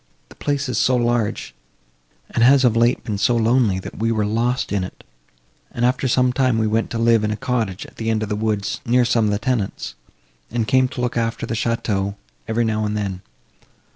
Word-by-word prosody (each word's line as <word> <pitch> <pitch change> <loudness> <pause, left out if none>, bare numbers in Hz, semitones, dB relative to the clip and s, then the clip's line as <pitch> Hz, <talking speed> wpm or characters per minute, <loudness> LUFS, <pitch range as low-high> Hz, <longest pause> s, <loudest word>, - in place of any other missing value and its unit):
The - - -15
place 140 -1 -2
is 125 - -1
so 130 - +3
large, 120 -3 0 0.8
and 115 - +1
has 135 +2 +6
of 115 -2 +3
late 120 +2 +2
been 105 -3 -3
so 120 +3 +3
lonely, 115 -3 +2
that 95 - -8
we 115 +1 +1
were 110 -2 +1
lost 120 +4 0
in 100 -2 0
it, 90 - -9 0.7
and, 120 - -1
after 130 +1 +1
some 125 0 +2
time, 130 -3 +2
we 110 - +1
went 110 +1 0
to 115 - -3
live 115 -1 +3
in 105 - 0
a 105 - -2
cottage 110 -5 -2
at - - -16
the 115 0 -2
end 110 -1 +1
of 105 - -4
the 105 - -1
woods, 105 -1 -2
near 125 +1 +3
some 115 -2 +2
of 105 - +1
the 105 - +1
tenants, 110 - -2 0.6
and 115 -1 -1
came 130 +4 +4
to 125 - -6
look 125 -1 -1
after 115 0 -1
the - - -4
château, 105 -4 -1 0.3
every 115 +1 +1
now 110 -1 0
and 105 0 -1
then. 95 -3 -3
115 Hz, 220 wpm, -21 LUFS, 105-125 Hz, 0.8 s, has